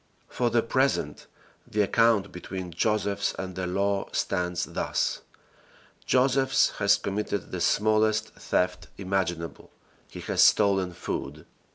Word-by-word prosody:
For 120 -1 -1
the 115 0 +2
present, 130 +4 0 0.4
the 105 0 +1
account 105 -1 +2
between 90 0 -7
Josephs 100 +2 0
and 95 -1 -5
the 95 -1 -3
law 100 +2 -1
stands 90 -2 -1
thus: - - -2 0.9
Josephs 135 +1 +3
has 100 0 +4
committed 100 +1 -3
the 90 - -4
smallest 110 +2 +2
theft 90 0 -2
imaginable. 95 -4 -3 0.4
He - - -9
has - - 0
stolen 95 -3 +4
food. - - -5
100 Hz, 115 wpm, -27 LUFS, 95-110 Hz, 0.9 s, has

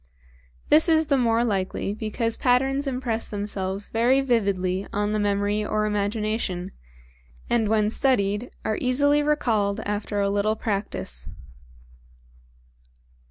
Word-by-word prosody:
This 315 +3 +5
is 320 -1 +4
the - - +6
more 230 -2 +2
likely 195 -2 -1
because 220 +2 -2
patterns 270 +3 +1
impress 250 -4 -2
themselves 200 -1 -3
very 240 +4 +3
vividly 200 -7 0
on 205 +1 -1
the 215 - 0
memory 205 +1 0
or 215 0 0
imagination, 210 -3 -2 0.8
and 225 -3 +2
when 215 -1 +2
studied 220 -3 +1 0.2
are 215 - -1
easily 285 +3 +3
recalled 225 -9 +1
after 205 0 -3
a 200 0 +1
little 205 +2 +1
practice. 195 - -3
215 Hz, 115 wpm, -24 LUFS, 200-245 Hz, 0.8 s, the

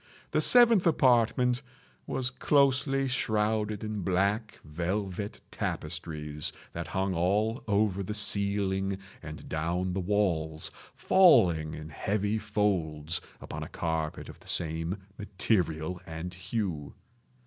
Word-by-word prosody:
The - - +2
seventh 235 -7 +6
apartment 125 -3 +3 0.5
was 130 -1 -1
closely 135 0 +2
shrouded 110 -3 0
in 105 -1 -3
black 100 +4 0
velvet 95 +5 -3
tapestries 75 -2 -2 0.2
that 85 -1 -5
hung 95 0 -1
all 105 +7 +1
over 100 -2 +2
the 105 +2 -3
ceiling 100 -2 +1 0.2
and 75 0 -9
down 85 +4 -1
the 95 - -1
walls, 85 -5 0 0.2
falling 85 - +5
in 75 0 -8
heavy 105 +6 -1
folds 90 -7 -1 0.2
upon - - -7
a - - -6
carpet 80 -2 -3
of - - -11
the - - -17
same 80 +3 0 0.2
material 90 -5 -1
and 80 +2 -6
hue. 90 -5 -4
95 Hz, 115 wpm, -29 LUFS, 85-110 Hz, 0.5 s, seventh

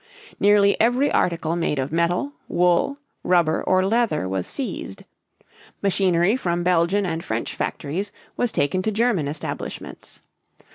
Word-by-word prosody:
Nearly 200 0 +5
every 245 +5 +3
article 165 -1 0
made 165 -3 -1
of 135 +1 -2
metal, 175 - 0
wool, 180 +10 +2 0.3
rubber, 170 -3 +2
or 185 0 +2
leather 215 - +1
was 95 -1 -2
seized. 270 - -5 0.8
Machinery 190 0 +2
from 175 -8 -1
Belgian 180 +3 +2
and 165 -1 -3
French 110 +1 -3
factories 185 +8 -3 0.2
was 245 -2 0
taken 185 +6 0
to 220 - -1
German 215 -8 +1
establishments. 150 +2 -6
180 Hz, 130 wpm, -23 LUFS, 165-205 Hz, 0.8 s, Nearly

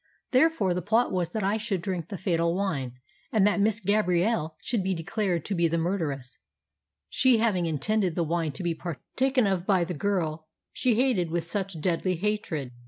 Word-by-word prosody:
Therefore, 255 - +3
the 180 - -2
plot 225 +5 +2
was 180 -3 0
that 220 -2 -3
I 200 +3 +1
should 210 -4 -2
drink 170 -2 -3
the 195 - -6
fatal 170 -2 0
wine, 150 -11 -2 0.4
and 210 -3 +4
that 205 0 +2
Miss 215 +1 +2
Gabrielle 190 -4 +1
should 230 -6 -1
be 190 0 0
declared 175 0 -1
to 205 - -2
be 170 -2 +2
the 165 +1 0
murderess, 160 -7 -2 0.7
she 255 -2 +4
having 205 -7 +1
intended 175 +4 0
the 170 - +1
wine 165 -1 -1
to 135 - -6
be 170 -1 0
partaken 250 - -1
of 190 -2 0
by 190 -4 +3
the 175 +1 -3
girl 160 -3 -1 0.3
she 250 -4 +1
hated 230 -9 +2
with 170 0 -1
such 190 0 -4
deadly 180 +3 0
hatred. 170 -8 -2
185 Hz, 185 wpm, -27 LUFS, 165-210 Hz, 0.7 s, and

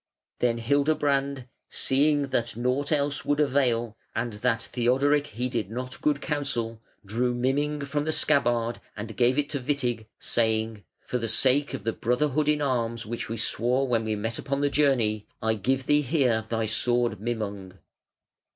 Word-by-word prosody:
Then 120 -1 +2
Hildebrand, 140 +1 +1 0.2
seeing 145 +2 +2
that 120 -3 -1
nought 130 +5 0
else 145 -1 +1
would 145 0 0
avail, 125 -6 +1 0.2
and 120 -1 -2
that 115 -2 +1
Theodoric 140 +5 +1
heeded 120 -3 -3
not 125 +3 -5
good 150 -2 +2
counsel, 120 -8 -2 0.2
drew 120 +4 0
Mimung 145 +4 0
from 145 +1 -2
the 155 - 0
scabbard 120 -7 +2 0.2
and 110 +1 -6
gave 125 +2 +3
it 145 -1 +1
to 145 - -2
Witig, 125 -4 -1
saying: 110 -2 0 0.2
"For 125 - -2
the 115 -1 -1
sake 135 +5 +3
of - - -7
the 115 +1 -1
brotherhood 145 +5 0
in 150 -1 +2
arms 115 -4 -1
which 115 +1 -5
we 115 - -3
swore 120 +4 +1
when 115 -3 +1
we 110 -1 -1
met 115 +2 -3
upon 140 0 -2
the 145 0 +1
journey, 120 -8 +2
I 110 0 +1
give 130 +6 -1
thee 145 +1 +4
here 125 -6 +1
thy 115 -1 0
sword 120 0 +1
Mimung. 100 -4 -4
125 Hz, 160 wpm, -26 LUFS, 115-140 Hz, 0.2 s, thee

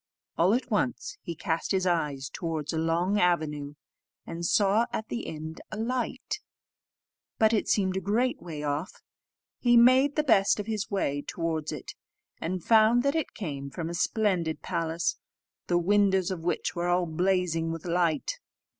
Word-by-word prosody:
All 180 +6 +4
at 250 0 -3
once, 235 +3 -1
he 170 - -6
cast 165 -1 -2
his 190 -2 +1
eyes 150 -6 0
towards 160 -3 -3
a 160 - 0
long 170 +5 +1
avenue, 150 -5 0 0.5
and 170 +1 -6
saw 205 +5 +3
at 220 - -4
the 235 - -4
end 160 +1 -7
a 215 - -5
light, 250 +3 -2 1.0
but 220 0 +4
it 215 - +1
seemed 190 -2 +2
a - - +1
great 230 +7 0
way 155 -4 -6
off. 150 +5 -3 0.6
He 240 -1 +4
made 255 +4 +6
the 305 - +2
best 200 -8 +4
of 205 - -3
his 215 -1 -3
way 145 -8 -1
towards 160 -1 -3
it, 150 -4 -7 0.5
and 180 +1 -3
found 225 +2 +5
that 280 0 +2
it 320 -2 -2
came 140 -9 -5
from 165 +3 -5
a - - -5
splendid 180 -4 0
palace, 165 0 -1 0.5
the 175 - +2
windows 190 0 +3
of 170 -3 -4
which 175 - -1
were 175 0 -1
all 175 0 +2
blazing 170 -1 0
with 165 0 -6
light. 175 - 0
180 Hz, 165 wpm, -28 LUFS, 165-215 Hz, 1.0 s, made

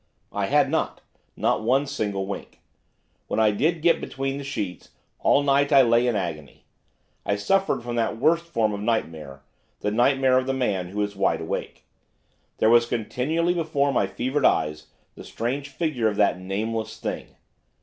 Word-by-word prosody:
I - - -1
had - - +3
not, - - -1 0.4
not - - +1
one 130 +6 +2
single 105 -8 -2
wink. 100 - -7 0.7
When - - -1
I 110 -1 +4
did 155 +9 0
get 170 -1 +4
between 135 +1 -3
the - - -6
sheets, 100 -10 -5 0.3
'all 140 - +3
night 140 +1 +2
I 135 -2 +7
lay 120 +1 +3
in 120 - +1
agony,' 80 -7 -5 0.6
I 100 - 0
suffered 195 - +1
from 120 0 -4
that 115 -1 0
worst 165 +6 +2
form 115 -10 0
of 100 - -4
nightmare, 80 -11 -3 0.4
the 105 - -1
nightmare 130 +3 +3
of 130 - -4
the 135 - 0
man 100 -8 -1
who 105 +3 -2
is 100 0 -4
wide - - +1
awake. - - -5 0.7
There 110 - +3
was 120 0 +5
continually 150 +10 0
before 155 -5 0
my - - +2
fevered 130 +3 -2
eyes 75 -6 +1 0.3
the - - -11
strange 135 +5 -3
figure 140 -6 -1
of 105 - -1
that 100 -3 +2
Nameless 110 +4 -3
Thing. - - -5
120 Hz, 170 wpm, -24 LUFS, 105-140 Hz, 0.7 s, I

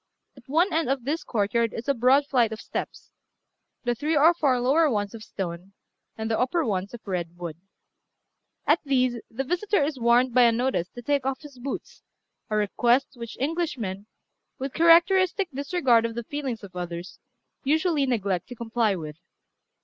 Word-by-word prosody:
At 260 -1 -18
one 340 +7 +2
end 320 -3 +1
of 270 -2 0
this 300 +3 -1
courtyard 230 -1 0
is 230 - -6
a 280 - +3
broad 260 +3 +4
flight 245 -5 +2
of 220 - -6
steps - - -6 0.7
the 240 -1 +1
three 300 +6 0
or 320 +4 +6
four 275 -7 +1
lower 290 +6 +3
ones 205 -4 -1
of 225 - -9
stone, 185 -1 -6 0.4
and 220 0 -3
the 220 - +1
upper 285 +6 +1
ones 200 +1 -2
of 235 - -13
red 175 -2 -3
wood. 170 -3 -6 1.1
At 300 +3 +4
these 255 -4 +1
the 250 +4 -3
visitor 360 +5 0
is 285 -2 -2
warned 240 +1 +3
by 250 - +5
a 235 -1 +6
notice 235 -7 0
to 245 - -8
take 285 +1 +1
off 265 0 -2
his 285 -4 -13
boots, 270 +3 -6 0.5
a 215 - -1
request 235 +5 +2
which 235 -3 -8
Englishmen, 255 - -2 0.5
with 265 0 -5
characteristic 355 +3 +4
disregard 270 -4 +2
of 230 - -8
the 235 - -3
feelings 260 -4 -4
of 185 -2 -11
others, 175 0 -6 0.4
usually 305 0 +2
neglect 200 -7 -1
to 245 - -9
comply 225 -3 0
with. 155 -3 -7
250 Hz, 175 wpm, -26 LUFS, 220-285 Hz, 1.1 s, or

